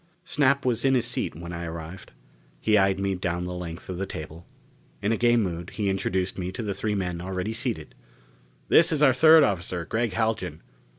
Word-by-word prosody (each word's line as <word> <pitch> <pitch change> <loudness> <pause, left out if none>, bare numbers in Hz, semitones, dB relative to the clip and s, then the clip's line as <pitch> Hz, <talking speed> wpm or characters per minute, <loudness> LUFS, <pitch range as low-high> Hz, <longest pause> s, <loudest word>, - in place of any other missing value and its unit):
Snap 140 -3 +2
was 120 -2 +1
in 135 0 +4
his 120 -2 +1
seat 125 - -2
when 85 +2 -7
I 85 0 -5
arrived. 85 +2 -8 0.5
He 110 - +2
eyed 95 -1 +3
me 100 0 0
down 90 -1 -2
the 90 0 -4
length 85 -2 -7
of 90 - -5
the 95 - -2
table. 80 +2 -8 0.5
In 105 +2 0
a - - +3
gay 120 +1 +3
mood, 85 -5 -2
he 105 -3 0
introduced 95 0 -1
me 90 0 -3
to 115 - -4
the 100 -2 -2
three 105 +1 -2
men 90 -3 -3
already 95 +4 -3
seated: 115 - -3 0.7
"This 170 +1 +5
is 150 -2 +1
our 135 -3 +6
third 160 +4 +7
officer, 90 - -1
Gregg 115 +3 -1
Haljan. 95 -7 -2
95 Hz, 200 wpm, -26 LUFS, 90-115 Hz, 0.7 s, third